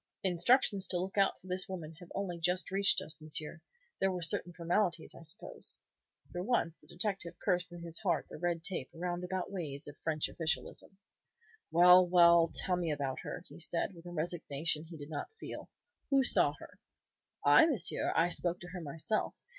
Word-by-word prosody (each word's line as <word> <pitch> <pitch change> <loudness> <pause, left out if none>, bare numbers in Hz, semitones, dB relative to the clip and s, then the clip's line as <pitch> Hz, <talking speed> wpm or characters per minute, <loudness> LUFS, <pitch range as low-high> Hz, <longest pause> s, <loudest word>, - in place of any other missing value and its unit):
"Instructions 195 +3 +3
to 180 - +1
look 185 +2 -4
out 195 -1 +2
for - - -22
this 185 0 0
woman 165 -4 -6
have 175 - -13
only 185 -3 -3
just 180 +3 0
reached 195 0 +3
us, 155 - -5
monsieur. 155 +1 -2 0.4
There 195 - +2
were 180 -2 -3
certain 170 +2 0
formalities, 170 0 -1
I - - -13
suppose." 160 -1 -1 0.5
For 175 - -4
once 180 -6 0
the - - -22
detective 180 -2 -2
cursed 175 -1 0
in 175 -1 -9
his 170 -1 -2
heart 170 -7 0
the - - -10
red 175 -2 -1
tape, 180 -9 -3
roundabout 180 +2 -3
ways 150 -7 -5
of 145 - -9
French 155 -2 -1
officialism. 165 +3 -4 0.7
"Well, 180 +2 +7
well! 170 -1 +6
Tell 180 -2 +1
me 170 -3 -1
about 140 -3 -3
her," 180 - -6
he - - -13
said, 170 +3 0
with 170 0 -13
a - - -7
resignation 160 -2 -1
he 165 0 -10
did 145 +1 -9
not 150 - -4
feel. - - -8 0.4
"Who 275 -1 +4
saw - - +5
her?" - - -14 0.7
"I, 325 - +7
monsieur. 255 - +1
I 165 +2 +3
spoke 175 0 0
to 175 - -9
her 180 0 -7
myself. 165 +8 -2
175 Hz, 185 wpm, -33 LUFS, 165-185 Hz, 0.7 s, Well